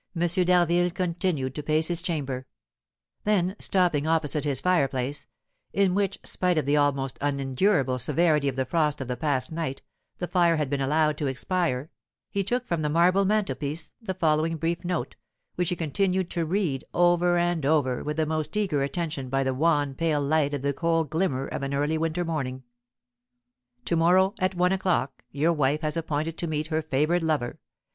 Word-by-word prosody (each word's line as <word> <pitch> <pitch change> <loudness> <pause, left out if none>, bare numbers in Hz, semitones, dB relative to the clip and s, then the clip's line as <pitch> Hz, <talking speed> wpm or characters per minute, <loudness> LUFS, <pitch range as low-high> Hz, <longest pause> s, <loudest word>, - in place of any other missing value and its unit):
d'Harville 175 0 +3
continued 170 -6 -2
to 150 - -4
pace 155 +2 +2
his 175 -1 0
chamber; 140 -7 -3 0.8
then, 190 -3 +1
stopping 175 -6 +2
opposite 155 -2 +1
his 140 -3 +3
fireplace, 140 -5 0 0.5
in 195 -2 +2
which, 200 -1 0
spite 180 -2 0
of 150 - +1
the 145 +1 +2
almost 140 -3 0
unendurable 135 0 +1
severity 150 +2 +2
of 135 - -1
the 130 0 -1
frost 150 +1 0
of 135 - -5
the 125 - -2
past 130 0 -1
night, 160 -5 -4 0.3
the 180 - -3
fire 175 -2 +3
had 150 -3 -2
been 140 -1 0
allowed 150 +2 +1
to 145 - -1
expire, 145 +1 -1 0.4
he 200 - 0
took 245 +5 -1
from 170 -7 -1
the 150 - 0
marble 180 +5 +3
mantelpiece 190 -7 -1
the 190 -4 -4
following 160 -1 +1
brief 165 +3 -2
note, 175 -1 -3 0.4
which 180 -1 -1
he 180 - 0
continued 180 +3 0
to 170 -2 -1
read 170 -7 -1
over 175 0 +3
and 175 -2 0
over 140 -4 +1
with 150 +1 -3
the 160 - +2
most 155 +3 -2
eager 185 -9 +1
attention 140 -2 -3
by 135 +1 +1
the 130 0 0
wan, 145 -1 +1
pale 155 +1 0
light 145 0 +1
of 140 - -5
the 140 0 +1
cold 165 -1 0
glimmer 155 -6 0
of - - -5
an 140 0 -2
early 145 +3 0
winter 165 +2 -1
morning: 130 -5 -3 1.2
"To 170 - 0
morrow, 185 +4 +4
at 185 0 0
one 180 +1 +2
o'clock, 180 -10 -1
your 150 +6 +1
wife 150 0 +1
has 155 -1 -1
appointed 160 0 -2
to 170 - -1
meet 155 -1 -2
her 160 - +1
favoured 155 +4 +1
lover. 155 -7 -1
160 Hz, 180 wpm, -26 LUFS, 140-175 Hz, 1.2 s, morrow